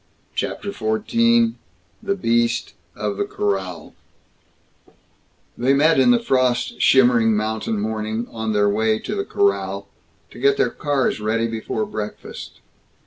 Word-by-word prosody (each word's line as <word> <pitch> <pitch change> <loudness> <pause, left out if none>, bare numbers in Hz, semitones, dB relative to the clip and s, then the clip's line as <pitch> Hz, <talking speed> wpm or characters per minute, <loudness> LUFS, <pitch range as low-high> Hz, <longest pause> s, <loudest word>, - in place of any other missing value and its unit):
CHAPTER 200 - -3
XIV 230 - +2 0.5
THE 200 -2 -1
BEAST 120 -9 0 0.2
OF 105 -1 -3
THE - - 0
CORRAL 95 -5 -3 1.6
They 125 +3 +2
met 155 +4 +4
in - - +5
the 245 - +6
frost 130 - 0
shimmering 120 -4 +5
mountain 110 0 -2
morning, 110 +2 -2
on 110 -1 -3
their 105 -1 +2
way 110 +2 +1
to - - -5
the 400 - -1
corral, 405 0 0 0.4
to - - -12
get 415 0 +3
their 415 - +2
cars 145 -6 -1
ready 110 +2 0
before 110 -1 -3
breakfast. 105 -1 -7
115 Hz, 130 wpm, -21 LUFS, 110-150 Hz, 1.6 s, the